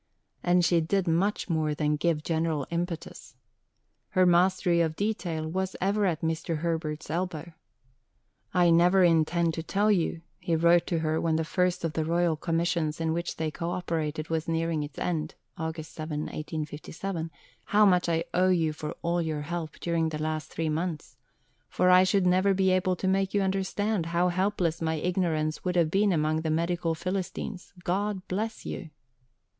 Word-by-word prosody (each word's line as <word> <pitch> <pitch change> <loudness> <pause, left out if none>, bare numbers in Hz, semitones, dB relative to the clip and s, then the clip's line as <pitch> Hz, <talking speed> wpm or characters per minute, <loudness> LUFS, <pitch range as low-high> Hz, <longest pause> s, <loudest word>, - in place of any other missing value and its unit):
And 175 0 +3
she 170 -1 +3
did 190 +3 0
much 185 +6 +1
more 155 -4 0
than 150 0 +1
give 150 0 0
general 160 -3 0
impetus. 170 -6 -4 0.7
Her 185 0 +3
mastery 180 0 +3
of 160 -1 0
detail 175 -6 -2
was 190 +3 -2
ever 200 +2 +1
at 165 -3 -1
Mr. 165 0 -1
Herbert's 160 -3 -2
elbow. 170 -1 -3 1.0
"I 175 -2 +4
never 180 +3 +5
intend 165 0 +3
to 165 - -3
tell 205 +6 +1
you," 170 -3 0 0.2
he 170 - 0
wrote 170 +1 +4
to 170 - 0
her 160 0 0
when 165 -1 +1
the 160 0 0
first 180 +2 0
of 165 -2 -1
the 160 - 0
Royal 170 0 +1
Commissions 165 -1 -1
in 160 -1 0
which 170 +1 -3
they 160 -1 -2
co 170 +2 -4
operated 160 -3 -2
was 160 -1 -1
nearing 165 -1 0
its 145 0 -7
end 155 -3 -2 0.2
(August 160 -2 -5
7, 155 -1 -4
1857), 160 +3 -5 0.4
"how 210 +1 +4
much 180 -3 +3
I 165 0 +1
owe 185 +1 +3
you 165 -4 +2
for 150 0 -6
all 170 +1 +1
your 155 -2 -2
help 165 +1 -5
during 165 -1 0
the 155 - -4
last 155 0 -3
three 165 0 -2
months, 155 -4 -3 0.5
for 180 0 +3
I 185 +1 +7
should 190 0 +2
never 185 +2 +3
be 190 0 +3
able 185 0 +2
to 190 - -3
make 195 +1 +1
you 200 - +3
understand 195 0 -1
how 175 +2 +2
helpless 180 -3 0
my 160 0 0
ignorance 160 -2 -1
would 180 -1 -1
have 165 -3 +3
been 200 +2 +3
among 155 -1 +1
the 160 - -2
Medical 170 +1 0
Philistines. 185 +2 -4
God 195 +1 -1
bless 215 +4 -3
you!" 165 - -5
170 Hz, 175 wpm, -28 LUFS, 160-180 Hz, 1.0 s, I